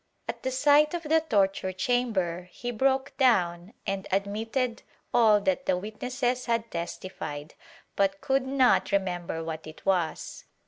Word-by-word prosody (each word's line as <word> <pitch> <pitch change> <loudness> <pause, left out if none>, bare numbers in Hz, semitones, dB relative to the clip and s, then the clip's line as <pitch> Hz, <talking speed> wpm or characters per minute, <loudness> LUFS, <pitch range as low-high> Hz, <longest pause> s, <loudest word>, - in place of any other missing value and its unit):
At - - -5
the 260 - -1
sight 290 +4 +4
of 340 - -4
the 320 +1 +3
torture 195 -9 +1
chamber 185 -5 -1
he 245 0 -5
broke 265 +3 +1
down 185 -6 +2
and 195 -1 -3
admitted 225 +5 -1 0.3
all 220 -3 +6
that 275 +5 0
the 180 - +3
witnesses 245 +5 -2
had 230 -1 0
testified, 170 -3 -6 0.4
but 195 0 +1
could 265 -1 0
not 265 -2 +3
remember 175 -4 -1
what 160 -1 -6
it 155 - -12
was. 180 -5 -1
215 Hz, 140 wpm, -27 LUFS, 185-260 Hz, 0.4 s, all